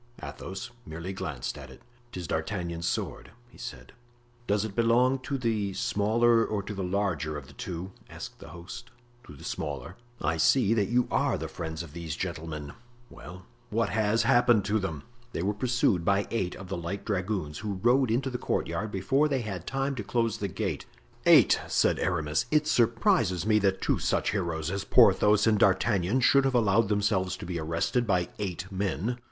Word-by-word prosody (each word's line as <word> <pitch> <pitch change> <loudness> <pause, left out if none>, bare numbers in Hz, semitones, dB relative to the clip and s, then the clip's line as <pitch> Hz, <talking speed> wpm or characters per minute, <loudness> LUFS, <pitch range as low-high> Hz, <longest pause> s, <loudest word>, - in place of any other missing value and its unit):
Athos 95 +4 -7
merely 85 +3 -6
glanced 75 -9 -4
at - - -10
it. - - -15 0.3
"'Tis 90 -4 -6
D'Artagnan's 85 +1 -3
sword," - - -3 0.2
he - - -18
said. 125 - -8 0.6
"Does 105 +1 +1
it 105 -3 -6
belong 120 +3 +3
to 130 +2 -3
the 110 -5 -1
smaller 115 +4 +2
or 105 -2 -2
to 105 - -6
the 95 -1 -4
larger 90 -5 -1
of 70 - -8
the - - -15
two?" 90 +1 -6 0.2
asked - - -9
the - - -11
host. 90 +8 -9 0.4
"To 75 - -11
the - - -13
smaller." 95 - -5 0.2
"I 80 +1 0
see 115 +6 +4
that 105 -4 +1
you 125 +1 +2
are - - +1
the - - -4
friends 80 -1 -5
of 75 -3 -12
these 85 -3 -5
gentlemen." 80 -5 -5 0.4
"Well, 90 +6 -11 0.2
what 110 -1 0
has 110 +3 +2
happened 120 -4 +4
to 110 +1 +1
them?" 80 -7 -4 0.3
"They 85 - -2
were 100 +2 +1
pursued 110 -5 +1
by 100 +3 +2
eight 95 -6 -1
of 95 - -9
the 95 - -4
light 85 +4 -5
dragoons, 95 -6 -2
who 105 -2 -3
rode 125 +1 +4
into 130 +4 0
the 125 - -3
courtyard 110 - -2
before 120 +10 +1
they 135 -3 0
had 95 -6 -6
time 135 +1 -1
to 105 - -3
close 115 +1 0
the 100 - -1
gate." 90 - -3 0.4
"Eight!" - - +7
said - - +2
Aramis; 80 0 0
"it 150 +1 +3
surprises 115 - +2
me 110 0 +4
that 95 -2 +1
two - - +1
such - - 0
heroes 85 -5 -2
as 100 0 -2
Porthos 105 0 +5
and 110 -2 +3
D'Artagnan 100 +3 +2
should 140 +1 +5
have 135 -1 +1
allowed 110 -2 +3
themselves 100 -3 +1
to - - -8
be 85 -1 -3
arrested 85 +10 0
by 90 -3 +1
eight 90 -3 -3
men." 100 +5 -2
100 Hz, 185 wpm, -28 LUFS, 90-115 Hz, 0.6 s, Eight